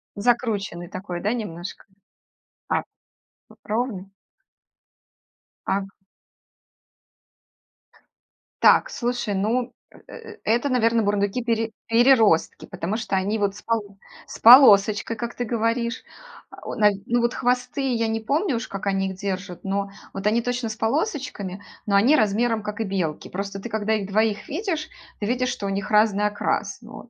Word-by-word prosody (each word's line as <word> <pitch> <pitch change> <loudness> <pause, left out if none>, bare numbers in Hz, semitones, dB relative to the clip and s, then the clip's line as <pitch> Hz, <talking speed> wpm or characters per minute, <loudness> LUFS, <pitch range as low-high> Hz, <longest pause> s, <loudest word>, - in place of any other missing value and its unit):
Закрученный 205 -6 -1
такой, 185 -2 -6
да, 210 +3 0
немножко? 185 -6 -6 0.8
А, - - +1 0.8
ровный? 210 -4 -3 1.6
А 195 - +1
г - - -7 2.8
Так, - - +5
слушай, 240 - -2
ну, 235 +5 -1 0.2
э - - -17
э 455 -2 -11
это, 240 +5 +1
наверно, 230 -2 +2
бурундуки 205 +3 0
пере 225 -1 0 0.2
переростки, 230 -7 +3
потому 190 +6 -4
что 225 -3 -2
они 200 +3 0
вот 200 -1 0
с - - -12
пол 210 -4 -2 0.3
с - - -9
полосочкой, 220 -3 +7
как 235 +1 -4
ты 245 - -3
говоришь. 230 +1 -1 0.5
Э, - - -8
нав 210 -1 +4
ну, 240 0 +2
вот 235 +1 +1
хвосты 250 +2 -1
я 230 0 0
не 225 0 -1
помню, 280 - 0
уж 230 - -5
как 195 0 -6
они 195 -1 0
их 190 - -6
держат, 190 -2 -5
но 200 +1 -2 0.2
вот 195 +1 -3
они 230 +3 +2
точно 245 -1 -2
с 220 - -5
полосочками, 225 - -2 0.2
но 200 - +2
они 245 +10 +5
размером 225 -1 +1
как 210 +1 -5
и - - +2
белки. 185 -7 -3
Просто 195 +1 -5
ты 195 - -6
когда 220 0 0
их 200 -2 -3
двоих 215 0 +1
видишь, 320 -1 -3 0.3
ты 205 - -3
видишь, 250 +3 0
что 255 -6 -4
у - - -1
них 195 +1 -3
разный 210 -1 +3
окрас. 205 0 -2
Вот. 235 +1 -12
220 Hz, 150 wpm, -23 LUFS, 200-240 Hz, 2.8 s, полосочкой